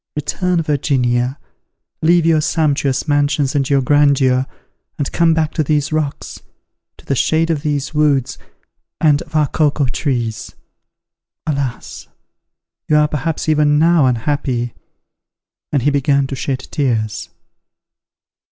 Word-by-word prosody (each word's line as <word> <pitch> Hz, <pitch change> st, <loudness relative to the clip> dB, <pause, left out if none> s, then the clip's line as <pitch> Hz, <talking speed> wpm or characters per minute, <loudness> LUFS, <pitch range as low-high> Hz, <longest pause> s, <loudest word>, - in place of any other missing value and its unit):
Return, 170 Hz, +3 st, -1 dB
Virginia! 130 Hz, -3 st, 0 dB, 0.6 s
leave 170 Hz, +1 st, +3 dB
your 160 Hz, -2 st, +3 dB
sumptuous 145 Hz, -3 st, 0 dB
mansions 145 Hz, -1 st, +1 dB
and 140 Hz, -3 st, 0 dB
your 140 Hz, -2 st, +2 dB
grandeur, 135 Hz, -2 st, +3 dB, 0.5 s
and 145 Hz, -, -2 dB
come 165 Hz, -1 st, +2 dB
back 160 Hz, -1 st, 0 dB
to 155 Hz, -, 0 dB
these 150 Hz, 0 st, 0 dB
rocks, 155 Hz, -3 st, -3 dB, 0.6 s
to -, -, -19 dB
the -, -, -1 dB
shade 160 Hz, +5 st, +1 dB
of 155 Hz, -3 st, -1 dB
these 145 Hz, -1 st, -2 dB
woods 140 Hz, -4 st, +1 dB, 0.6 s
and 150 Hz, -2 st, +3 dB
of 155 Hz, -2 st, -11 dB
our 155 Hz, -1 st, +4 dB
cocoa 145 Hz, -1 st, +1 dB
trees. 120 Hz, -5 st, -3 dB, 0.9 s
Alas! 140 Hz, -5 st, -4 dB, 0.8 s
you 150 Hz, -, +4 dB
are 150 Hz, 0 st, +4 dB
perhaps 150 Hz, +2 st, -3 dB
even 150 Hz, -1 st, +3 dB
now 165 Hz, -2 st, +4 dB
unhappy!" 125 Hz, -1 st, -1 dB, 1.0 s
and 140 Hz, -4 st, 0 dB
he 145 Hz, -, +3 dB
began 140 Hz, 0 st, +2 dB
to 135 Hz, -, -5 dB
shed 130 Hz, 0 st, -4 dB
tears. 115 Hz, -7 st, -1 dB
145 Hz, 125 wpm, -17 LUFS, 135-155 Hz, 1.0 s, our